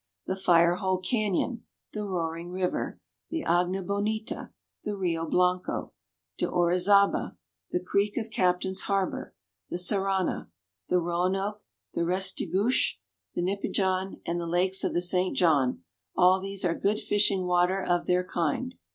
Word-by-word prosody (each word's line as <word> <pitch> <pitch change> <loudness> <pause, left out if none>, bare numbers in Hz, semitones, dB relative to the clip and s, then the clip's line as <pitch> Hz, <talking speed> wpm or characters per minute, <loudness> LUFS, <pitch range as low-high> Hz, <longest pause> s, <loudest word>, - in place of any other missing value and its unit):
The 190 - -2
Fire 175 -2 +4
Hole 190 -2 0
Canyon, 215 +4 -1 0.3
the 210 - -3
Roaring 170 -3 -3
River, 180 0 -2 0.3
the 325 -1 -3
Agna 180 +2 +1
Bonita, 210 +3 -2 0.3
the 205 -1 -3
Rio 165 -3 -1
Blanco, 180 +2 0 0.5
de - - +1
Orizaba, 180 +3 +3 0.3
the 180 - 0
creek 200 +3 0
of 225 -2 -3
Captains 185 0 +1
Harbor, 195 -2 -1 0.3
the - - -3
Saranna, 190 - 0 0.4
the 180 - +3
Roanoke, 185 +4 -1 0.3
the - - -1
Restigouche, 190 +5 +1 0.4
the - - 0
Nipigon, 190 0 -1
and 170 +1 -1
the 170 - -4
lakes 185 +3 +1
of - - 0
the 175 - +1
St. 180 +1 +1
John, 140 - +2 0.3
all 185 +1 +5
these 195 0 -2
are 170 - +2
good 205 +4 0
fishing 200 -2 +2
water 180 +2 +2
of 175 -2 0
their 180 0 +2
kind. 180 - -2
185 Hz, 140 wpm, -28 LUFS, 175-200 Hz, 0.5 s, all